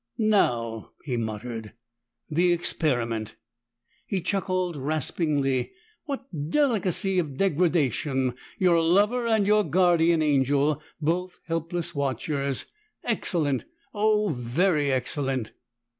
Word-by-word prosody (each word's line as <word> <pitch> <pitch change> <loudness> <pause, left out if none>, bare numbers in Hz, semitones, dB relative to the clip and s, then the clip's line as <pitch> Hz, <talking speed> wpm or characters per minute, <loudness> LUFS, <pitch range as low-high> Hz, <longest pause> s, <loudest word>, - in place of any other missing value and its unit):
"Now!" 120 - +1
he 130 -4 -2
muttered. 110 -1 -4 0.5
"The 175 +3 +2
experiment!" 120 -10 -1 0.7
He 195 - -1
chuckled 185 -1 -1
raspingly. 145 -2 0 0.3
"What 275 -3 -4 0.2
delicacy 195 - +2
of 145 -6 -3
degradation! 150 - +1 0.2
Your 180 -5 +4
lover 205 +8 +3
and 220 -3 +3
your 210 +1 +4
guardian 170 -1 +3
angel 145 +1 +2 0.2
both 175 +4 -1
helpless 165 +1 -3
watchers! 140 0 -1 0.4
Excellent! 145 -6 0 0.3
Oh, 210 -1 +2
very 145 +3 +1
excellent!" 130 -2 -1
160 Hz, 95 wpm, -26 LUFS, 135-185 Hz, 0.7 s, Your